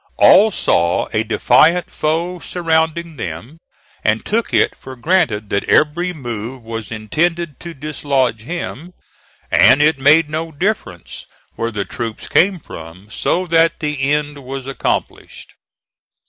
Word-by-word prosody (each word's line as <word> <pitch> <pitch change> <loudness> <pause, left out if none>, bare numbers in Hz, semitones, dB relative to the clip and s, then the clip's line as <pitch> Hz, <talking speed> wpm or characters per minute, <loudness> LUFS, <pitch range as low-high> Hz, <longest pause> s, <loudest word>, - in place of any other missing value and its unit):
All 215 +3 +7
saw 85 - +1
a 110 - +1
defiant 155 +10 +3
foe 170 +4 -1
surrounding 165 -1 -1
them, 115 - -7 0.4
and 110 +1 +1
took 225 +2 -1
it - - +2
for 130 0 -11
granted 120 - 0
that 100 - 0
every 170 +4 +2
move 120 -4 -6
was 115 -2 -6
intended 155 +9 -2
to 170 -1 -8
dislodge 140 -5 -1
him, 170 +3 -6 0.6
and 135 - +6
it 150 -1 +3
made 150 +4 +5
no 160 +2 -4
difference 160 - -4 0.3
where 115 - -2
the 105 -3 -3
troops 115 -2 -6
came 185 0 +3
from 90 - -11
so 185 +2 0
that 165 -1 +2
the 145 -2 -1
end 150 -1 -1
was 135 0 -6
accomplished. 135 0 -4
150 Hz, 135 wpm, -18 LUFS, 115-170 Hz, 0.6 s, All